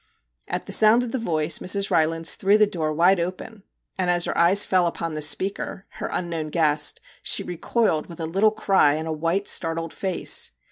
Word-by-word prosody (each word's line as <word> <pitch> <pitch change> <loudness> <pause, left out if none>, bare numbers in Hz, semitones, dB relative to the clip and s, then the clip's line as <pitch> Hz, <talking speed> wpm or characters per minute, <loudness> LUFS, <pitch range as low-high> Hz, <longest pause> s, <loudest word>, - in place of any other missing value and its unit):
At - - -4
the - - -9
sound 220 +3 +6
of 240 - -6
the 260 - -2
voice 160 -6 -1
Mrs. 200 +2 0
Rylands 165 +1 +1
threw 200 +2 +2
the 215 - +5
door 160 -6 -3
wide 175 +4 +3
open, 185 +5 -6 0.4
and 180 -1 0
as 175 -1 +1
her - - -3
eyes 185 +4 +4
fell 185 -2 +2
upon 165 -1 -4
the 155 - -5
speaker 190 +5 -1
her - - -7
unknown 165 -3 -4
guest 150 -2 +1 0.2
she - - +1
recoiled 175 -1 -1
with 170 -1 -11
a 165 - -3
little 195 +7 +2
cry 195 -8 +2
and 160 +1 -5
a - - -3
white 170 +6 -2
startled 165 0 -1
face. 190 - -2
175 Hz, 195 wpm, -23 LUFS, 160-195 Hz, 0.4 s, sound